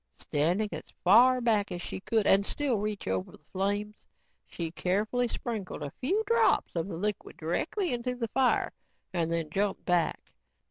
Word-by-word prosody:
Standing 175 +9 0
as - - -4 0.2
far 250 +7 +6
back 215 -4 +2
as 175 - -3
she 175 - -5
could 220 +2 0
and 195 +1 +5
still 260 0 0
reach 210 0 -3
over 95 0 -1
the 150 - -17
flames, 205 +2 -2 0.4
she 165 -2 -4
carefully 210 +8 0
sprinkled 215 -9 -4
a 145 - -6
few 380 +12 +1
drops 465 - +2
of 165 +1 -1
the 175 -4 -5
liquid 210 +2 -3
directly 300 - -1
into 245 +1 -2
the 235 -2 -2
fire 260 +1 +2 0.4
and 170 -2 +1
then 165 -2 -1
jumped 200 +3 -1
back. 175 -2 +1
205 Hz, 170 wpm, -29 LUFS, 175-240 Hz, 0.4 s, far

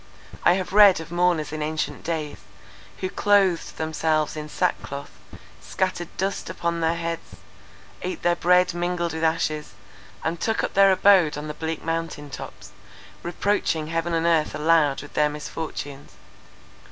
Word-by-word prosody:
I 175 - +6
have 185 0 -3
read 205 -3 +7
of 165 0 -9
mourners 175 -3 +1
in 155 - -4
ancient 155 +1 -3
days, 160 -3 -3 0.6
who 185 - -1
clothed 195 -4 +2
themselves 155 -1 0
in 150 0 -6
sackcloth, 140 -5 -2 0.5
scattered 185 -2 -2
dust 195 +1 -2
upon 170 0 -2
their 165 +1 +2
heads, 170 0 -5 0.7
ate 185 - -4
their 175 0 +3
bread 180 +1 +3
mingled 175 -1 -1
with 160 0 -4
ashes, 160 -2 -1 0.5
and 165 +1 -2
took 220 -1 0
up - - -2
their 195 0 +6
abode 185 -5 +5
on 150 +1 -5
the 150 - -4
bleak 160 +1 -4
mountain 165 -3 -3
tops, - - -9 0.5
reproaching 170 -3 -1
heaven 165 +1 -1
and 165 0 0
earth 165 -2 +2
aloud 150 -3 +2
with 145 - -13
their 150 0 +3
misfortunes. 150 -2 -6
165 Hz, 150 wpm, -24 LUFS, 155-180 Hz, 0.7 s, read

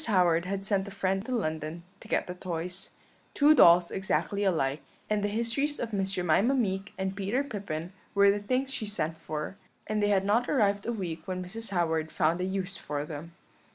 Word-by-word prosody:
Howard 180 -5 +3
had 195 +1 -3
sent 195 -2 +1
to - - -7
a - - -12
friend 195 +3 -1
in 250 - +1
London 160 -3 -3 0.2
to - - -12
get - - +1
the 180 - -5
toys 180 0 -5 0.5
two 295 +1 +6
dolls 175 - +7
exactly 190 +1 0
alike, 155 -7 +1 0.3
and 210 -1 +1
the - - +2
histories 235 +7 0
of 230 -2 -4
Miss 195 -1 0
Jemima 190 - +3
Meek 195 -6 -1
and 190 0 -2
Peter 205 +7 0
Pippin 190 - -5 0.2
were 200 0 +6
the 205 - -1
things 255 +6 -1
she 215 - -3
sent 165 -6 -1
for; 155 +4 -5 0.3
and 215 -1 -1
they 205 - +3
had 195 -1 +3
not 225 +4 +2
arrived 205 -6 +2
a - - +1
week 170 -7 -5
when 185 -1 -3
Mrs. 225 +4 -4
Howard 160 -4 0
found 165 +3 +1
a - - 0
use 190 0 -3
for 145 0 -4
them. 155 +2 -8
195 Hz, 205 wpm, -29 LUFS, 170-210 Hz, 0.5 s, dolls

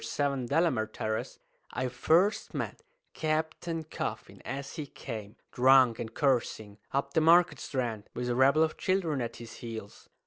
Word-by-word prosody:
7, 140 -3 -1
Delamere 130 -8 +2
Terrace, 110 0 -3 0.4
I 130 - -1
first 180 - +2
met - - -4 0.3
Captain 160 +1 -2
Coffin 155 - -5
as 135 +3 -5
he 150 -2 -4
came, 110 -5 -7 0.2
drunk 130 -2 +5
and 110 - -4
cursing, 115 -6 0
up 140 +1 -1
the 160 - +3
Market 170 +2 +5
Strand, 120 -8 -3
with 125 0 -2
a 120 - +1
rabble 135 +5 +5
of 160 - -1
children 170 -7 0
at 115 -1 -4
his 115 -1 -10
heels. 110 -3 -8
135 Hz, 150 wpm, -30 LUFS, 115-160 Hz, 0.4 s, drunk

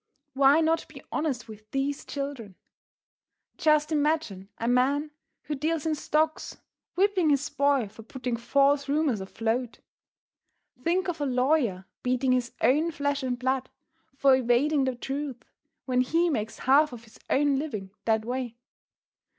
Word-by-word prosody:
Why 275 +3 +5
not 325 0 +1
be - - -12
honest 265 -7 -2
with 215 -1 -12
these 275 +3 -2
children? 275 -9 -5 1.0
Just 305 0 +3
imagine 295 -11 0
a 230 - -3
man 275 +5 +2 0.3
who 305 - -4
deals 310 +2 -1
in 320 - +1
stocks 310 +1 -1 0.4
whipping 380 -3 +3
his 285 0 +2
boy 280 -5 +2
for 215 +3 -13
putting 250 +1 -4
false 275 +4 +2
rumors 285 -8 +1
afloat! 225 +5 -2 1.1
Think 365 +3 +1
of 335 -4 -3
a 290 - +1
lawyer 250 -7 +1 0.2
beating 255 +1 +1
his 250 -1 +1
own 305 +6 +3
flesh 285 -2 -1
and 255 -2 -2
blood 260 +1 -1 0.5
for 275 -1 +5
evading 260 +3 +2
the 260 -1 -1
truth 270 -1 -5 0.4
when 255 -1 +2
he 330 +6 +2
makes 220 -5 -3
half 285 +3 +4
of 235 -1 -9
his 220 - -18
own 280 0 +2
living 210 -11 -5
that 220 -1 +1
way! 245 -1 -4
270 Hz, 145 wpm, -27 LUFS, 240-300 Hz, 1.1 s, Why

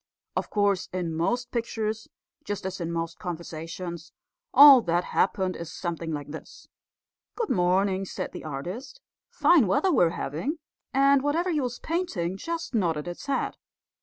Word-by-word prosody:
Of - - -2
course, 200 -3 +1
in 175 -3 -2
most 240 +10 -1
pictures, 220 -2 -2 0.4
just 205 -2 -4
as 190 -1 -4
in 170 0 -2
most 165 0 -3
conversations, 170 -1 -6 0.4
all 280 -2 +10
that 175 -3 +1
happened 190 -1 0
is 170 -1 -7
something 170 -2 -4
like 145 -2 -5
this: 160 - -10 0.7
'Good 460 -3 -2
morning,' 190 +2 +2
said - - -5
the - - -8
artist, 180 - -6 0.3
'fine 315 - +4
weather 280 - +2
we're 175 - +5
having,' 170 - -3 0.3
and 275 +1 +4
whatever 325 +6 0
he 305 -3 +1
was 245 -1 -3
painting 235 - -2
just 335 - -5
nodded 170 -8 0
its 175 +10 -7
head. 275 - -1
190 Hz, 150 wpm, -27 LUFS, 170-260 Hz, 0.7 s, all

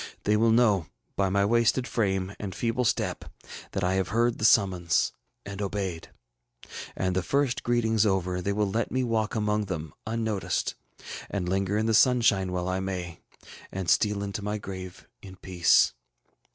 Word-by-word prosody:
They 105 - +2
will 115 +2 +3
know, 110 -7 +3 0.3
by 100 -1 +1
my 100 +1 +2
wasted 115 +3 +2
frame 95 -3 -1
and 95 -3 -5
feeble 120 +2 -1
step, - - -1 0.5
that 95 - -2
I 90 +1 +1
have 95 -1 0
heard 120 +2 +1
the 110 - 0
summons 95 -6 +3 0.3
and 100 +1 -6
obeyed. 95 -4 -3 0.9
And, 95 -1 -1
the 95 - +2
first 140 +4 0
greetings 115 -3 +2
over, 95 -3 0
they 100 - -1
will 105 0 0
let 115 +2 -1
me 130 +1 0
walk 115 -3 -1
among 105 -1 0
them 80 -6 -5
unnoticed, 110 -3 -1 0.6
and 95 -3 -3
linger 95 +2 0
in 110 - 0
the 115 - +1
sunshine 110 -6 +4
while 90 0 -2
I 95 0 -1
may, 90 -3 -5 0.5
and 95 -2 -4
steal 105 -1 +2
into 100 +1 -4
my 105 +1 -2
grave 95 -3 -8
in 95 -1 -11
peace. 90 -3 +3
100 Hz, 165 wpm, -27 LUFS, 95-110 Hz, 0.9 s, sunshine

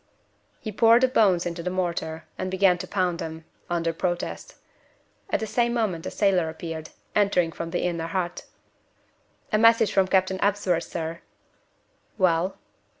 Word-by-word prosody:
He 215 - -5
poured 230 +3 +5
the 260 - +5
bones 195 -8 +3
into 170 0 -3
the 180 - -2
mortar, 170 -3 -2
and 185 - -3
began 190 -1 +3
to - - -6
pound 180 -3 0
them 160 0 -6 0.2
under 170 -1 0
protest. 175 +1 -3 0.7
At - - +1
the 220 - -2
same 235 +2 0
moment 195 -8 -1
a - - -1
sailor 185 -5 +2
appeared, 160 -1 -6 0.3
entering 195 -5 +3
from 165 0 -5
the 175 - -2
inner 170 -2 -1
hut. 175 0 -3 1.1
"A 215 - +4
message 230 -2 +5
from 190 -1 +3
Captain 190 0 +1
Ebsworth, 195 -4 +1
sir." 165 0 -5 1.0
"Well?" 185 -1 +2
180 Hz, 150 wpm, -25 LUFS, 170-200 Hz, 1.1 s, poured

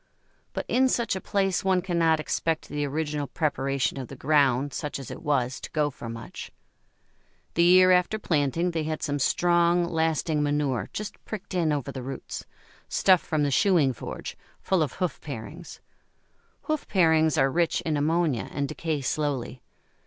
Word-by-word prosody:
But - - -3
in 260 +1 +3
such 235 -5 0
a 190 - -4
place 195 -3 0
one 190 -2 +2
cannot 165 -3 +2
expect 160 +1 -2
the 145 0 -2
original 150 0 -2
preparation 135 -2 -1
of 130 - -5
the 135 - -9
ground, 140 -1 +2
such 150 -2 -4
as 135 -3 -8
it - - -8
was, 135 -5 0
to - - -7
go 150 -2 +1
for 115 - -8
much. 115 0 -8 1.0
The 170 - +2
year 185 +1 +7
after 180 +4 +3
planting 165 -1 0
they 165 -1 -1
had 155 0 -3
some 145 0 -1
strong, 175 +4 +3
lasting 160 -2 0
manure 145 -3 0
just 210 0 -6
pricked 215 -2 -7
in 170 -4 +1
over 145 -4 -2
the 130 - -6
roots 130 +1 -7 0.4
stuff 185 -3 +4
from 155 -2 -1
the 145 - +1
shoeing 155 -4 +3
forge, - - -7 0.2
full 190 -3 +1
of 150 -5 0
hoof 180 -5 -3
parings. 150 +5 -8 0.8
Hoof 310 -2 -2
parings 160 -5 +3
are 135 0 +3
rich 170 +3 +1
in 160 -2 -1
ammonia, 150 - +1
and 140 -1 -2
decay 155 -1 -3
slowly. 135 -3 -2
155 Hz, 165 wpm, -26 LUFS, 140-175 Hz, 1.0 s, year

